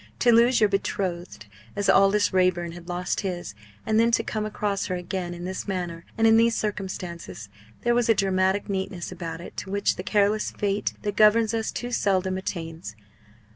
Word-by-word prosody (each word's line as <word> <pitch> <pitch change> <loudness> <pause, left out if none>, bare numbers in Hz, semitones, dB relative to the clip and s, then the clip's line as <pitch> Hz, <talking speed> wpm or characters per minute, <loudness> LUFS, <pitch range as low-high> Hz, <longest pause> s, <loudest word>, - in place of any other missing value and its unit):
To 240 - +4
lose 235 +2 +5
your 215 - +5
betrothed 185 - -3 0.3
as 205 -1 -1
Aldous 195 +1 +4
Raeburn 180 -2 +2
had 175 +1 -11
lost 180 +1 -2
his, 175 - -4 0.3
and 220 0 +2
then 230 +1 +4
to 230 - +3
come 215 -1 -3
across 205 -1 -2
her 185 - -2
again 180 0 -4
in 175 +1 -7
this 185 +2 -5
manner 175 -3 -4
and 225 - +3
in 225 0 +6
these 230 0 +4
circumstances 185 - -5 0.3
there 240 - +2
was 240 -1 +1
a 225 - +6
dramatic 190 0 +1
neatness 190 -2 -3
about 170 -2 -6
it - - -10
to 190 - -5
which 200 +1 0
the - - -3
careless 210 0 +1
Fate 205 0 -1
that 205 -1 -2
governs 215 +1 +5
us 225 -1 -1
too 245 0 -5
seldom 190 -4 +1
attains. 165 - -5
195 Hz, 185 wpm, -25 LUFS, 180-215 Hz, 0.3 s, in